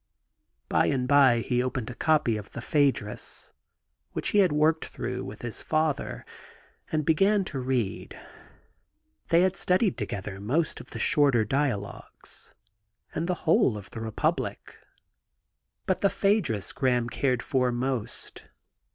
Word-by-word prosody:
By - - +2
and 125 -3 0
by 135 -4 +5
he 125 0 0
opened 125 -2 -3
a - - -7
copy 145 -4 +2
of 105 -1 -8
the - - -5
Phuedrus^ 135 -6 -1 0.6
which - - -1
he 210 - +3
had 185 -4 +5
worked 155 +2 +2
through - - -5
with 105 +3 -9
his 120 -2 -4
father, 155 -2 -1 0.7
and 155 -2 0
began 195 +5 +3
to 140 -7 -4
read. 125 -6 -2 1.1
They 170 +1 +4
had 185 0 +2
studied 185 - +1
together 100 -1 -5
most 140 +11 -1
of - - -12
the - - -7
shorter 135 -7 +3
dialogues, 120 -5 -3 0.6
and 170 - -2
the 180 - 0
whole 135 -8 +4
of 100 -3 -11
the - - -7
Reptiblic^ 110 -1 -2 1.1
but 185 - 0
the 200 - +4
P/iaedrus 185 - 0
Graham 125 -3 +1
cared 125 0 0
for 125 -2 +1
most. 125 -2 -3
130 Hz, 140 wpm, -27 LUFS, 115-160 Hz, 1.1 s, by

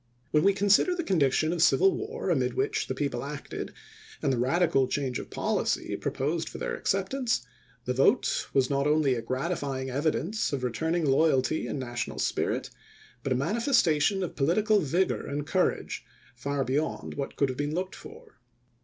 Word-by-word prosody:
When 150 - +4
we 200 +1 +5
consider 205 - +4
the 345 - -2
condition 155 - +2
of 170 - -1
civil 385 - +5
war 455 +4 -3
amid - - +1
which 430 +2 0
the - - -3
people - - -2
acted - - -6 0.5
and 140 -3 +1
the 120 - -1
radical 135 +1 +2
change 130 -2 -2
of - - -8
policy - - -1
proposed 160 +5 -2
for - - -8
their - - -3
acceptance, 195 - -1 0.4
the 125 - 0
vote 140 - +2
was 135 -2 +3
not 140 +1 +1
only 150 -3 +3
a 120 - -2
gratifying 135 +1 -2
evi 145 +4 +1
dence 210 0 -2
of 135 -2 -2
returning 160 +7 0
loyalty 140 +1 +2
and - - -3
national 120 -2 -4
spirit, - - -1 0.5
but 135 - -3
a - - +3
manifestation 195 - +2
of 175 - -5
political 205 +9 +3
vigor 175 +5 0
and 145 +1 -3
courage 185 +4 0 0.3
far 140 +3 -2
beyond 140 +5 -2
what 140 -1 -4
could 140 - +1
have 130 - -4
been 145 +2 -1
looked 185 +1 -2
for. 455 -1 -13
155 Hz, 170 wpm, -28 LUFS, 135-195 Hz, 0.5 s, we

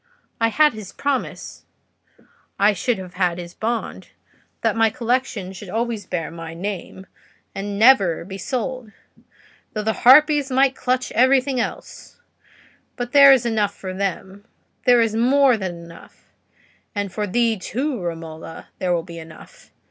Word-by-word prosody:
I 230 - +3
had 300 +5 +3
his 215 -4 -9
promise—I 255 -6 -4
should 235 +5 -1
have 185 -1 -9
had 180 -2 0
his 175 -1 -8
bond—that 230 +2 -5
my 225 0 +3
collection 230 -4 -2
should 190 +1 -10
always 225 -1 -3
bear 165 -3 -3
my 165 -1 -8
name 190 0 -6 0.5
and 195 +1 -5
should 200 -1 -4
never 200 -8 +4
be 195 +1 -8
sold, 255 0 -4 0.8
though 215 - -3
the 220 +1 0
harpies 290 +2 +6
might 265 0 +2
clutch 255 0 -1
everything 260 +2 +3
else; - - -6 0.8
but 245 -1 -5
there 280 0 +8
is 255 -3 +4
enough 210 -3 0
for 185 -2 -7
them—there 200 +5 -2
is 225 -1 0
more 260 +2 +4
than 190 -5 -4
enough—and 190 +3 -11
for 210 -1 -2
thee, 230 +3 +1
too, 255 +4 -3
Romola, 165 -1 -7
there 180 -2 0
will 165 - -2
be 170 -1 -10
enough. 160 -1 -14
215 Hz, 140 wpm, -21 LUFS, 185-250 Hz, 0.8 s, there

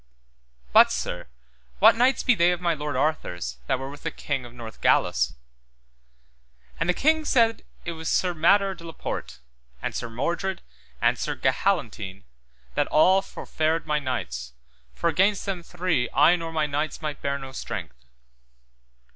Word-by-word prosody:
But, - - +8
sir, - - -3 0.5
what - - +7
knights 250 +3 +3
be 250 - +5
they 175 -5 +4
of 180 - -1
my 175 -2 +1
lord 150 -2 -4
Arthur's 90 - -2
that - - +1
were 135 +1 -6
with 145 +1 -10
the - - -2
King 135 -4 -4
of 120 - -11
Northgalis? 115 - +1 1.4
And 170 - 0
the - - +4
king 315 +2 +3
said 230 -6 +2 0.2
it 175 - -2
was 160 -1 -5
Sir 180 -1 +1
Mador 195 +4 +3
de 170 - -13
la 165 -1 -8
Porte, 60 - -5 0.4
and - - -4
Sir 120 - -4
Mordred 170 - -2 0.4
and - - +2
Sir - - -2
Gahalantine 95 -1 -1 0.5
that - - +1
all 185 +5 +5
for - - -10
fared 160 +1 0
my 150 -1 +1
knights, 60 - -4 0.4
for - - 0
against 190 +4 +2
them 190 -3 -3
three 170 -7 -1
I 150 +5 +6
nor 165 -2 -5
my 155 -1 +1
knights 150 +2 -3
might 150 -2 -4
bear 140 0 -1
no 135 -1 -8
strength. - - -7
155 Hz, 165 wpm, -25 LUFS, 130-180 Hz, 1.4 s, But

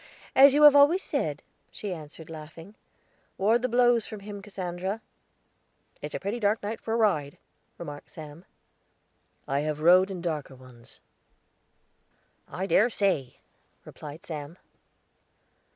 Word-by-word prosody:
"As 275 +1 +8
you 300 - +4
have 295 -1 +9
always 295 +7 +5
said," - - -2 0.3
she 205 -3 -6
answered, 155 -1 -10
laughing. 160 +4 -11 0.6
"Ward 220 +5 +2
the 255 - -1
blows 240 -1 +3
from 215 -2 -8
him, 205 0 -8
Cassandra." 190 0 -5 1.0
"It's - - -6
a - - -3
pretty 205 +5 -3
dark 210 0 0
night 215 +2 -4
for 225 - -2
a - - +1
ride," 155 -11 +1 0.4
remarked 150 -2 -9
Sam. 155 +2 -11 1.0
"I 140 +1 0
have 150 0 -2
rode 180 +4 +5
in 190 -2 -5
darker 155 -6 -4
ones." 125 -2 -16 1.5
"I 190 - -4
dessay," 195 - +1 0.5
replied 150 +2 -11
Sam. 155 +1 -7
185 Hz, 130 wpm, -27 LUFS, 150-220 Hz, 1.5 s, have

